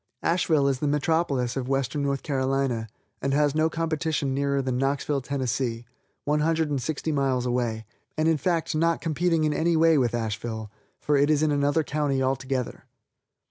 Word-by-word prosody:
Asheville 160 -4 +2
is 135 -2 0
the 150 - -1
metropolis 145 -4 0
of 130 -1 -3
Western 135 +2 0
North 140 -1 -1
Carolina, 135 -4 0 0.3
and 135 0 0
has 145 -1 +3
no 155 +1 +2
competition 160 -3 -1
nearer 140 0 0
than 130 -2 -1
Knoxville, 140 +1 0
Tenn., 130 +1 -3 0.8
one 150 +1 +1
hundred 160 0 +1
and 140 -3 -1
sixty 155 +4 -2
miles 135 -4 0
away, 120 -3 -1 0.3
and, 155 +1 +2
in 165 -1 +3
fact, 165 +2 0
not 165 +2 +1
in 165 - 0 0.4
any 165 +2 +1
way 165 +1 +5
competing 155 - +4
with 120 -2 +1
Asheville, 110 -1 -4 0.3
for 145 -1 +1
it 145 +2 +3
is 155 0 +3
in 155 - +2
another 145 +2 +2
county 145 -2 -1
altogether. 130 -1 -2
140 Hz, 175 wpm, -26 LUFS, 130-155 Hz, 0.8 s, way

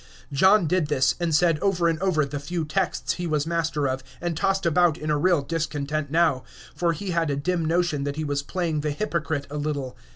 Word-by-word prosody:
John 190 +6 +5
did 170 0 +1
this, 145 -3 +2
and 175 -1 0
said 165 -1 +3
over 180 -3 +1
and 165 -1 0
over 175 -6 +1
the 140 +1 -5
few 165 +3 -3
texts 180 +4 -1
he 175 -1 -4
was 150 -2 0
master 165 -3 -1
of, 130 0 -2 0.2
and 175 -1 -2
tossed 195 +3 0
about 170 -1 +3
in 155 -1 -3
a 150 - +2
real 175 -3 +3
discontent 150 -1 -2
now, 160 -4 +2 0.3
for 170 -1 +1
he 185 +4 -4
had 165 -2 +1
a 140 - 0
dim 170 +4 -1
notion 165 -3 +1
that 140 0 -3
he 155 - -3
was 145 -1 -1
playing 160 0 -2
the 150 - -1
hypocrite 155 -3 -2
a 150 - -4
little. 145 -3 -3
160 Hz, 220 wpm, -25 LUFS, 145-175 Hz, 0.3 s, John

